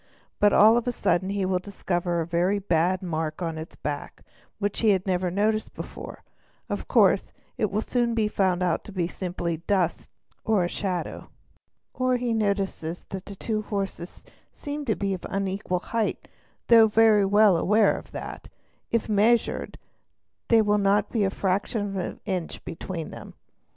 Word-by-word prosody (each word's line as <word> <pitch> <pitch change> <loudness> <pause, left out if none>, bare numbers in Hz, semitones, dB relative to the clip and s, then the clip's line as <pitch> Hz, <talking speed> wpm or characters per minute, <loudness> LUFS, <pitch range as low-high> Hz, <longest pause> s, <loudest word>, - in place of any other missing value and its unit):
But 205 0 +5
all 220 +4 +7
of 240 +1 -1
a - - +2
sudden 185 -4 0
he 200 -1 -1
will 185 -1 +1
discover 175 -3 -2
a - - -2
very 175 +4 +1
bad 180 -1 +1
mark 160 -1 -3
on 165 -2 -3
its 160 - -9
back 145 -1 -5 0.3
which 205 -1 -2
he 225 - +3
has 190 -2 +2
never 185 -1 0
noticed 215 +4 0
before; - - -8 0.5
of - - -4
course, - - +3 0.2
it 215 - 0
will 215 +2 -1
soon 240 -2 0
be 220 -2 +2
found 185 -3 +1
out 175 -2 0
to - - -9
be 180 -3 -1
simply 175 -2 -3
a - - -3
dust 180 +1 -1 0.3
mark 220 -3 +2
or - - +1
shadow: 180 -1 -4 0.6
or 255 -1 +1
he 245 -1 -1
notices 195 -6 -1
that 190 0 -6
the 200 - -7
two 215 +2 -2
horses 195 -4 -5 0.3
seem 290 0 -6
to 220 -5 +1
be 195 -1 -1
of 185 - -6
unequal 195 -2 -2
height; 225 -2 -1 0.4
though 225 -2 +7
very 215 -1 +5
well 205 0 +5
aware 210 +5 +3
that, - - -7 0.4
if 230 -1 0
measured, 220 +3 +1 0.7
there 225 -2 +5
will 210 0 +2
not 200 +1 +2
be 220 -4 +1
a 195 - +2
fraction 200 +2 -1
of 195 -1 -5
an 185 - -4
inch 185 -5 -4
between 170 -1 -6
them. - - -10
195 Hz, 170 wpm, -26 LUFS, 180-215 Hz, 0.7 s, all